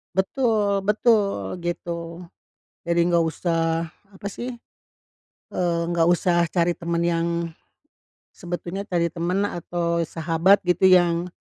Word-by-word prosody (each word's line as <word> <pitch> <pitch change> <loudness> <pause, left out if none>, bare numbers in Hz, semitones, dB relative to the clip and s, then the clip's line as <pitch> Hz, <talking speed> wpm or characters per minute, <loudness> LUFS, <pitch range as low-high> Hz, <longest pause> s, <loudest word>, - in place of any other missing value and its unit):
Betul 205 -1 +1
betul, 200 - +1
gitu. 170 0 -5 0.6
Jadi 170 0 +1
nggak 170 -1 +3
usah 165 0 -1 0.2
apa 195 +1 -7
sih, 240 +5 -6 1.0
eee, 175 -2 0
nggak 165 -1 +2
usah 175 0 +2
cari 175 -1 +1
temen 170 0 -2
yang 170 0 +1 1.1
sebetulnya 180 +2 -5
cari 170 -3 0
teman 175 +4 -2
atau 170 -1 -2
sahabat 165 +5 +2
gitu 180 +1 +1
yang 175 -1 +4
175 Hz, 110 wpm, -23 LUFS, 170-190 Hz, 1.1 s, yang